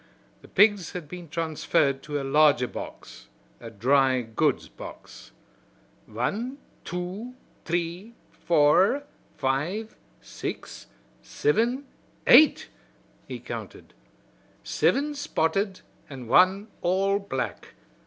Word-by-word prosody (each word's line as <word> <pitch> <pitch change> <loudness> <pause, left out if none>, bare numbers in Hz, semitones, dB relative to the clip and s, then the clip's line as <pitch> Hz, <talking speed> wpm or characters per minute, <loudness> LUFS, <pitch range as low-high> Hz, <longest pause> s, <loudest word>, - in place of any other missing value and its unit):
The - - -15
pigs 205 -3 +3
had 175 -4 -6
been 175 0 -9
transferred 155 -4 0
to 145 0 -4
a - - -4
larger 140 -2 +4
box - - -9 0.3
a 115 - -9
dry 130 +4 +2
goods 115 -1 0
box. - - -12 0.8
"Wan, 210 - -3 0.3
two, 185 +8 -5 0.3
t'ree, 175 +6 -3 0.2
four, 170 - +3 0.3
five, 150 +11 -2 0.2
six, - - -7 0.3
sivin, 260 - 0 0.4
eight!" 310 - +6 0.6
he - - -6
counted. - - -8 0.7
"Sivin 295 +2 +1
spotted 195 - -1 0.3
an' 130 -3 -8
wan 190 - +4
all 195 +3 +1
black. 135 -11 -5
175 Hz, 95 wpm, -26 LUFS, 140-205 Hz, 0.8 s, eight